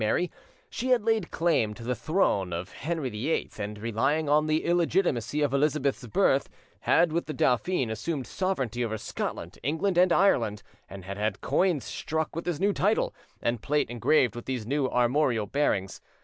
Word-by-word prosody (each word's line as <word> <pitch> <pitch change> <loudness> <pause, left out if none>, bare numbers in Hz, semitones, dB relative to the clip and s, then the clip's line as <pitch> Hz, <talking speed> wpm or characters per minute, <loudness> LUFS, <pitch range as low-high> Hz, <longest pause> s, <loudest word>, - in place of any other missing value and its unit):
Mary, 170 +11 +1 0.4
she 255 - -4
had 250 -4 +4
laid 225 -6 +1
claim 155 -11 +1
to 115 - -10
the 125 +2 -1
throne 120 - +1
of 85 +2 -4
Henry 155 -4 -3
VIII, 120 +10 -2
and, 105 0 -4
relying 125 +8 0
on 150 +1 +3
the 155 +1 +1
illegitimacy 170 - +1
of 140 -2 0
Elizabeth's 140 -3 +1
birth, 105 - +2 0.3
had 170 -1 +3
with 170 - -1
the 155 - -4
dauphin 130 +1 +1
assumed 130 +5 -3
sovereignty 130 - -2
over 110 -2 -2
Scotland, - - -5
England, 165 +7 0
and 180 0 +5
Ireland, 115 - +2 0.3
and 95 -2 -9
had 100 +1 -6
had 105 -2 -1
coins 180 -7 +1
struck 160 -1 -3
with 165 - -4
this 175 -4 -2
new 200 +1 +2
title, 205 +4 +1 0.3
and 120 -2 0
plate 145 -2 0
engraved 120 +1 +2
with 120 - -7
these 125 -4 -3
new 135 +2 0
armorial 125 -2 +2
bearings. 100 -6 -1
140 Hz, 175 wpm, -27 LUFS, 115-165 Hz, 0.4 s, and